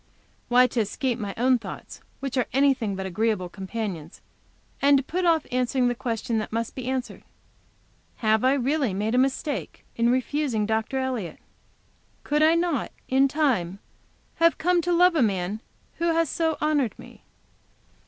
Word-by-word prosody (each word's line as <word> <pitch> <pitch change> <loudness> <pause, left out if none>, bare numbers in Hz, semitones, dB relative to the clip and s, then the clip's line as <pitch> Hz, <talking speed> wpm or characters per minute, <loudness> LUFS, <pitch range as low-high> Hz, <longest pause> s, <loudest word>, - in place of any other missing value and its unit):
Why, 250 +1 +5
to 250 -1 -2
escape 240 +3 -1
my 205 -3 -4
own 250 +1 +3
thoughts, 205 -4 -9 0.2
which 275 -1 -4
are 255 -3 +1
anything 265 -7 +2
but 190 0 -4
agreeable 190 -1 -1
companions, 190 -4 -6 0.6
and 280 0 +6
to 270 - -1
put 360 +6 -2
off 325 -3 +3
answering 250 0 +1
the - - 0
question 230 -2 -2
which 215 - -5
must 230 +1 -2
be 255 -2 -6
answered, 260 -1 -3 0.9
"Have 220 -1 +1
I 260 +1 +4
really 275 -5 0
made 210 +3 -1
a 250 - +3
mistake 270 +2 -2
in 235 0 +2
refusing 255 -3 0
Dr. 220 +4 -1
Elliott? 255 -9 -3 0.9
Could 300 +1 0
I 320 +2 +5
not, 335 -7 0 0.2
in 270 +1 +4
time, 255 - 0 0.6
have 335 0 +4
come 355 +1 +2
to 350 +2 -1
love 355 +1 +5
a 315 - +2
man 200 -1 0 0.4
who 335 - 0
has 330 -3 +1
so 325 -1 0
honored 295 -6 0
me?" - - -14
255 Hz, 165 wpm, -25 LUFS, 220-285 Hz, 0.9 s, and